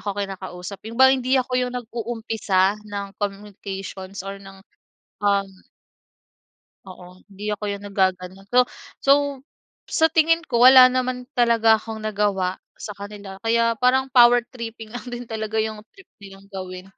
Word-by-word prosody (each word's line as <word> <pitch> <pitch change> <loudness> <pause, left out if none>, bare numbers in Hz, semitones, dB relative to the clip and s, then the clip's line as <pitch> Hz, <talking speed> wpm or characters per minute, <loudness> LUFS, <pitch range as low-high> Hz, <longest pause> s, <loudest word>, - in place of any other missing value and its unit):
ako 205 - -2
kinakausap 190 -1 -6
yung 230 - -9
ba 265 0 +7
hindi 260 0 +1
ako 255 0 -1
yung 250 0 -3
nag-uumpisa 220 -4 -1
ng 205 -1 -5
communications 195 -1 -6
or 195 0 -7
ng 195 0 -13 0.7
um 200 -1 +2 1.4
Oo, 180 -1 -13 0.2
hindi 205 +2 -7
ako 210 0 -3
yung 200 0 -7
naggaganon. 190 -1 -1
So, 250 - +4 0.4
so 275 - +5 0.8
sa 320 - +3
tingin 330 +1 +3
ko 240 -6 -1
wala 255 0 +9
naman 255 -1 -2
talaga 230 -3 +4
akong 220 0 -7
nagawa 200 -3 -1 0.2
sa - - -8
kanila 200 -1 -9
kaya 230 +1 +2
parang 260 +1 +2
power 240 -1 +6
tripping 225 -3 -8
lang 245 - -7
din 245 0 -6
talaga 220 -1 -5
yung 220 -1 -5
trip 390 -2 -18
nilang 195 -1 -13
gawin. 185 -1 -7
210 Hz, 145 wpm, -22 LUFS, 195-245 Hz, 1.4 s, wala